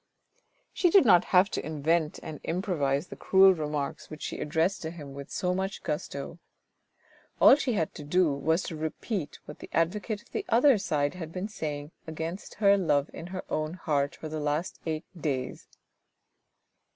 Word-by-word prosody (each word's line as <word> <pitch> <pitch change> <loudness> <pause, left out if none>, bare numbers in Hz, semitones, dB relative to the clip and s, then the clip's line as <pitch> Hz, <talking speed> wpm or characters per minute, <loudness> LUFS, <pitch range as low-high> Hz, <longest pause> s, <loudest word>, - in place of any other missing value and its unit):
She 355 - +3
did 370 -3 +6
not 180 -5 +6
have 185 +1 +4
to - - -2
invent 160 +1 0
and 155 - -7
improvise 165 -5 0
the - - -7
cruel 190 0 +6
remarks 150 -4 -4
which 155 -1 -8
she - - -4
addressed 165 +6 0
to 160 - -4
him 150 -5 -9
with 140 0 -8
so 180 0 -1
much 190 +1 -3
gusto. 150 0 -4 1.0
All - - +9
she 265 -4 -1
had 165 -7 -1
to 150 - -8
do 160 +1 +2
was 160 +5 +1
to 165 - -5
repeat 160 +1 -4
what 150 - -10
the - - -10
advocate 205 +5 -1
of - - -27
the - - -2
other 245 0 +5
side 145 -5 0
had 165 -3 -7
been 185 +3 -4
saying 150 -6 -5 0.2
against 160 +4 -5
her 200 -1 +4
love 145 -5 +1
in 165 - -7
her 185 0 -5
own 155 +2 -2
heart 145 -5 -1
for 155 - -7
the 155 0 -4
last 150 +3 -2
eight 155 0 -2
days. 140 -6 -3
160 Hz, 175 wpm, -28 LUFS, 150-185 Hz, 1.0 s, All